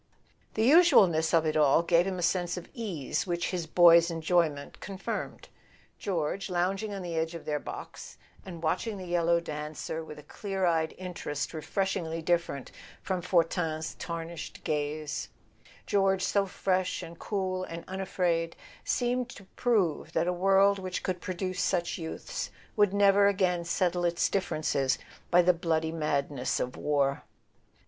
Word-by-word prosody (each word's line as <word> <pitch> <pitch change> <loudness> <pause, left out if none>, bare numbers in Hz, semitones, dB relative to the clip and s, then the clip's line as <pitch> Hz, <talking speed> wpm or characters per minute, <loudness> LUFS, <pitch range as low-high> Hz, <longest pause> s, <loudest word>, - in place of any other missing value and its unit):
The 220 - +1
usualness 210 - +6
of 165 -1 +3
it 155 - 0
all 150 +1 +4
gave 170 +1 +3
him 190 -1 -2
a 175 - -3
sense 175 +1 0
of 180 - -7
ease 200 - -3
which 175 0 -1
his 175 -3 -3
boy's 170 0 +7
enjoyment 165 -3 0
confirmed. 195 -1 -5 0.5
George, 185 +1 -2
lounging 190 +4 0
on 195 -2 -5
the 175 -1 -4
edge 160 +1 -1
of 165 - -8
their 150 -1 -1
box, - - -8 0.3
and 170 -3 -9
watching 200 +6 -1
the 185 - -7
yellow 170 -1 +2
dancer 155 0 -5
with 150 -1 -10
a 150 - -11
clear 195 -2 -3
eyed 160 -2 +1
interest 165 -6 -4
refreshingly 165 0 -2
different 165 -5 -1 0.3
from 185 -2 -1
Fortin's 165 -2 0
tarnished 165 -1 -6
gaze, 150 0 -2 0.6
George 195 -1 +2
so 200 -1 +1
fresh 185 0 -1
and 165 0 -10
cool 185 -2 -2
and 170 -2 -6
unafraid, 180 -3 -1 0.3
seemed 245 0 0
to 205 - -11
prove 205 -11 +1
that 165 - +2
a 180 - +1
world 195 +2 +4
which 185 -1 -4
could 185 -2 -2
produce 185 -1 -3
such 175 -2 0
youths 170 - -5 0.3
would 205 -3 +4
never 200 0 +5
again 185 -3 +1
settle 175 +1 0
its 170 0 +1
dif¬ 195 - +2
ferences 145 -6 0 0.3
by 175 0 +6
the 180 +1 +5
bloody 160 -2 0
madness 145 -4 -1
of 125 - -3
war. 140 -2 +1
175 Hz, 155 wpm, -29 LUFS, 160-190 Hz, 0.6 s, boy's